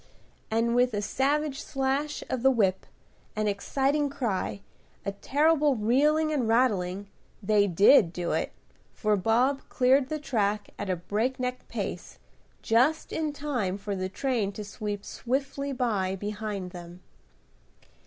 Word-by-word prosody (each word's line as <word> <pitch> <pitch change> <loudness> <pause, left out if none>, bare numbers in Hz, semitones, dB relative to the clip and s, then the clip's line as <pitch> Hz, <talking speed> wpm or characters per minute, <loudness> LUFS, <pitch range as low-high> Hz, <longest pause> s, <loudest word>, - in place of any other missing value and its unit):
and 230 +1 +1
with 245 -2 +3
a - - 0
savage 280 +4 0
slash 275 +2 -2
of 255 - -2
the 265 - +5
whip, 195 -7 +1 0.5
an 215 0 0
exciting 275 +8 0
cry, 215 -7 -2 0.4
a 200 - -1
terrible 295 +6 +2
reeling 295 +8 +2
and 260 -6 0
rattling, 205 -5 +1 0.4
they 205 0 +3
did 195 +1 +6
do 175 -1 -3
it; - - -1 0.4
for 215 -1 +1
Bob 240 +8 +2
cleared 260 +1 +3
the 310 - -1
track 210 -7 -1
at 195 - -4
a 185 - +1
breakneck 250 +7 -2
pace, - - -5 0.5
just 255 +8 +2
in 310 -2 -1
time 260 -10 -2
for 200 0 -4
the 185 0 -3
train 230 -2 -1
to 210 - -7
sweep 205 0 -5
swiftly 275 +2 -2
by 210 -8 0
behind 205 -2 -4
them. 175 0 -10
230 Hz, 135 wpm, -27 LUFS, 200-275 Hz, 0.5 s, did